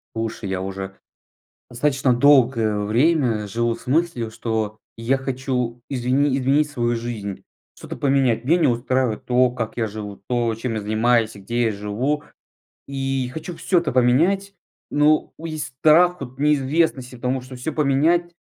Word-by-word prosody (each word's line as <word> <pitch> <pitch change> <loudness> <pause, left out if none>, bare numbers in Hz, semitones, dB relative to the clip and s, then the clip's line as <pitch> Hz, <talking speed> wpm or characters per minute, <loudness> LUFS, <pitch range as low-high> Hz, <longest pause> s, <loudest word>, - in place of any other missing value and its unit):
Слушай, 115 -2 -4
я 95 -1 -2
уже 95 0 -6 0.7
достаточно 135 0 +1
долгое 120 -5 +4
время 115 0 +1
живу 115 +3 0
с - - -13
мыслью, 130 -5 0
что 110 -2 -3 0.2
я 120 +4 0
хочу 125 -2 -3
извини 130 +2 +1
изменить 140 +3 +2
свою 120 -4 0
жизнь, 110 -4 -5 0.3
что-то - - -8
поменять. 135 -4 +1
Меня 165 +6 +3
не 155 -5 +3
устраивает 120 -1 0
то, 125 0 +3
как 120 -2 -5
я 115 -2 0
живу, 105 -1 -8
то, 120 -2 0
чем 115 +1 -4
я 110 - -2
занимаюсь 110 +2 +1
и 100 - -12
где 120 +5 -1
я 110 - +1
живу. 110 +9 -2 0.7
И 135 -2 -2
хочу 160 +4 -6
всё 180 - +1
это 170 -2 -2
поменять. 165 +12 +2 0.4
Но 150 +1 +2
у 165 - -6
есть 150 -4 -5
страх 175 +2 +5
от 130 0 -9
неизвестности, 140 -2 +1
потому 125 +2 -2
что 130 0 -10
всё 135 +5 -4
поменять 155 +5 +2
125 Hz, 155 wpm, -22 LUFS, 115-145 Hz, 0.7 s, страх